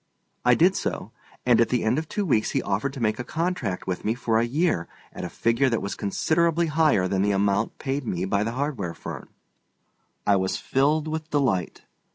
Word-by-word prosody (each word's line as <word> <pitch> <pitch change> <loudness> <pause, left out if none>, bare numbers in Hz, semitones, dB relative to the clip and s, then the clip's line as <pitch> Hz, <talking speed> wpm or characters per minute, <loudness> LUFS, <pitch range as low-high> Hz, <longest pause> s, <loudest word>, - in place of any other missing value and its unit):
I - - +5
did - - +4
so, - - -3 0.3
and 120 -2 +5
at 115 - +3
the 125 - +1
end 115 +6 +2
of 160 - -7
two 205 - -1
weeks 115 -10 +2
he - - +2
offered 105 +8 -1
to 135 - -7
make 110 -1 0
a - - -2
contract 165 - -2
with 90 -1 -3
me 110 +2 0
for 115 -2 +1
a - - +2
year 145 - 0 0.3
at - - -7
a - - -4
figure 115 +4 +1
that 115 - 0
was 100 - -4
considerably 165 - +1
higher 150 - +3
than 95 0 0
the 100 - +2
amount 100 +2 +1
paid 135 +1 -2
me 90 -1 -1
by 100 +1 +1
the 115 +2 -2
hardware 130 - -3
firm. - - -8 1.0
I 100 -1 +4
was 95 0 -1
filled 150 +4 +1
with 160 0 -4
delight. 125 - 0
120 Hz, 210 wpm, -25 LUFS, 100-150 Hz, 1.0 s, I